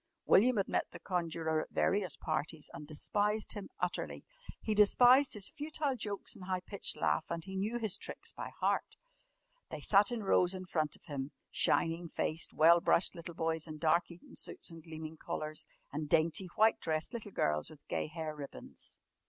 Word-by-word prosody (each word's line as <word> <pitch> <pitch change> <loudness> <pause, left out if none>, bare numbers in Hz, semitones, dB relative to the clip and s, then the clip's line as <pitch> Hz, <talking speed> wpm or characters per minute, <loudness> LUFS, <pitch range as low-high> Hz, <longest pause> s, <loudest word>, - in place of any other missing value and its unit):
William 240 +4 +5
had 195 - +1
met - - 0
the - - -10
conjurer 165 -3 -1
at - - -8
various 195 -4 +1
parties 155 0 -3
and 150 - -8
despised 210 +7 0
him 205 -2 -7
utterly. - - -2 0.4
He 220 - -1
despised 245 +6 +6
his 205 -2 0
futile 295 -2 -2
jokes 205 -4 -4
and 185 - -10
high 185 -1 -1
pitched 200 +2 -3
laugh - - +1
and 170 0 -3
he 190 0 -7
knew 210 +5 -1
his 220 -5 0
tricks - - -7
by - - -6
heart. - - -1 0.7
They - - -5
sat 200 +3 +5
in 235 -3 -2
rows 185 -1 +3
in 185 0 -6
front 155 -4 -1
of - - -20
him 140 -4 -4 0.2
shining 165 +1 +1
faced, 160 +1 -1
well 170 +2 +6
brushed 175 - +3
little 170 -1 -8
boys 160 0 0
in 155 -1 -7
dark 165 +2 +2
Eton 170 0 -13
suits - - -3
and 165 0 -10
gleaming 160 0 -8
collars, 155 0 -4 0.3
and 150 0 -3
dainty 165 +4 +3
white 220 +1 +4
dressed 160 +6 -1
little 225 -3 -5
girls 75 - 0
with 155 -2 -16
gay - - -1
hair 155 -1 -5
ribbons. 145 -2 -10
170 Hz, 185 wpm, -34 LUFS, 155-205 Hz, 0.7 s, despised